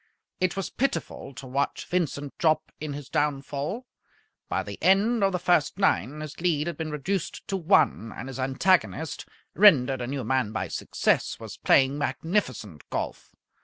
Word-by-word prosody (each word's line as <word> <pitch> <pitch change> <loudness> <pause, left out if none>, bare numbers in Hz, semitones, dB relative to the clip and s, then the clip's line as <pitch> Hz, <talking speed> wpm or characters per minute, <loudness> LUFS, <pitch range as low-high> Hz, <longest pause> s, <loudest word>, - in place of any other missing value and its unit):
It 185 +1 0
was 195 - -3
pitiful 270 - -2
to 130 - -8
watch 135 +2 -2
Vincent 145 -5 -2
Jopp 155 -2 +2
in 150 -1 -4
his 145 -1 -7
downfall. 145 - -2 0.6
By - - 0
the - - -8
end 205 +4 +4
of 195 - +4
the 180 - 0
first 175 -2 +2
nine 150 - +1
his 155 +1 -8
lead 160 -4 +1
had 170 -1 -3
been 160 +1 -4
reduced 155 +5 -3
to 195 - 0
one, 155 - +2
and 125 - -7
his 135 0 -7
antagonist, 155 +4 +1 0.3
rendered 135 -10 +5
a 120 - -3
new 135 0 -3
man 125 -2 0
by 110 - -2
success, - - 0
was - - -8
playing 135 +2 +3
magnificent 130 - -2
golf. - - -5
150 Hz, 165 wpm, -26 LUFS, 135-180 Hz, 0.6 s, rendered